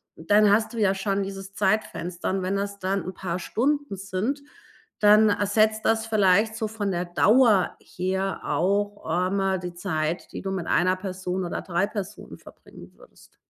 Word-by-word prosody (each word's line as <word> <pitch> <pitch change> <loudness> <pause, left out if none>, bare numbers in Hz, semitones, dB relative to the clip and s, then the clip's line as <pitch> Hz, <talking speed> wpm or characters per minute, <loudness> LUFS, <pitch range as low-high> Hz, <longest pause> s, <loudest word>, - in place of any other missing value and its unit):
dann 205 +5 +3
hast 220 +3 +2
du - - -7
ja 200 -3 +3
schon 195 0 -1
dieses 195 0 -8
Zeitfenster, 190 -4 -1
und 190 0 -1
wenn 190 +2 -1
das 200 0 -3
dann 195 -1 -1
'n 185 - -6
paar 180 -1 -3
Stunden 285 - -1
sind, 200 +9 -3 0.6
dann 210 +1 +6
ersetzt 215 +2 +2
das 225 0 +1
vielleicht 215 0 +3
so 220 -1 -2
von 210 -2 -3
der 175 0 -2
Dauer 210 +3 +4
her 190 +1 -3
auch 200 +6 0
einmal 190 +3 0
die 180 -1 -6
Zeit, 170 -2 -3
die - - -5
du 195 - -3
mit 185 -4 -3
einer 185 +1 +2
Person 185 -1 -4
oder 175 - -4
3 180 +2 0
Personen 205 -1 -7
verbringen - - -15
würdest. - - -20
195 Hz, 170 wpm, -25 LUFS, 185-210 Hz, 0.6 s, dann